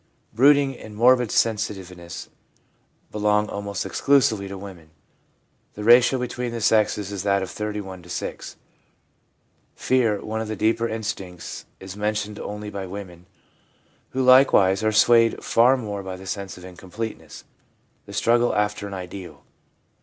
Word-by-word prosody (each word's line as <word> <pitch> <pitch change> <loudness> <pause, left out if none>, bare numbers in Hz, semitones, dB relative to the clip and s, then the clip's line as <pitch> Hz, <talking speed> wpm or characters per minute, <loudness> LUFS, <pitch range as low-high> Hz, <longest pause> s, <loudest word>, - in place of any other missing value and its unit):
Brooding 140 +2 +4
and 105 -1 -11
morbid 125 +1 +4
sensitiveness 95 -7 -2 0.8
belong 105 0 +1
almost 100 0 -4
exclusively 110 0 +2
to 100 0 -7
women 95 -5 -11 0.4
— - - -43
the 105 - -6
ratio 120 +3 +6
between 125 -1 -4
the 115 - -4
sexes 105 -2 +1
is 100 -2 -4
that 100 0 +1
of 95 - -6
31 105 -3 -5
to 85 - -16
6. 90 - -5 1.2
Fear, 115 -6 +1
one 110 +1 -3
of 110 - -4
the 110 - -4
deeper 115 +3 +1
instincts, 105 -6 -6
is 95 0 -9
men 105 +1 -1
tioned 105 0 -4
only 105 0 -6
by 100 -2 -5
women, 90 -2 -9 0.8
who 130 - -1
likewise 125 -7 +5
are 110 - +2
swayed 115 +1 +4
far 125 +3 +4
more 105 -5 -5
by 95 -1 -6
the 95 +1 -11
sense 100 0 -5
of 90 - -11
incompleteness, 95 +5 -8 0.6
the - - -10
struggle 120 +1 +2
after 105 0 -1
an 100 - -6
ideal. 90 0 -9
105 Hz, 145 wpm, -23 LUFS, 95-115 Hz, 1.2 s, ratio